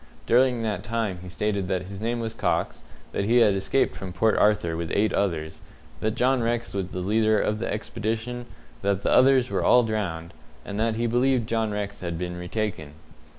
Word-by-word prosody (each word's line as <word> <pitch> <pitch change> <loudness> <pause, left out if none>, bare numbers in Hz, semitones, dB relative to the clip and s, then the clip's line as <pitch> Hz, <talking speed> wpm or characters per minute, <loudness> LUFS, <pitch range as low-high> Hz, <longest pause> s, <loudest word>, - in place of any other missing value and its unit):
During 125 -1 +3
that 105 -5 -2
time 115 -5 -2
he 90 - -9
stated 100 +2 -1
that 95 -1 -1
his 100 +2 -9
name 120 +2 -1
was 115 -1 -3
Cox, - - -1 0.3
that 100 - -1
he 115 +4 +3
had 110 -4 +5
escaped 95 +7 0
from 95 -1 -6
Port 110 +5 +2
Arthur 105 -6 +2
with 85 0 -3
eight 105 +2 +2
others, 80 -6 -1 0.4
that 110 +5 -1
John 130 0 +2
Rex 120 0 -1
was 95 -2 -2
the 90 0 -5
leader 110 +3 +2
of 105 0 0
the 115 - -2
expedition, 115 +3 -3 0.3
that 100 -1 0
the - - +1
others 130 -1 +5
were - - 0
all 125 0 +6
drowned, 90 -7 -3 0.3
and 100 +1 -5
that 115 0 +1
he 115 +1 -1
believed 120 0 +2
John 115 -1 0
Rex 105 -1 -4
had 85 -2 -3
been 90 0 -4
retaken. 90 -4 -4
105 Hz, 195 wpm, -25 LUFS, 95-115 Hz, 0.4 s, all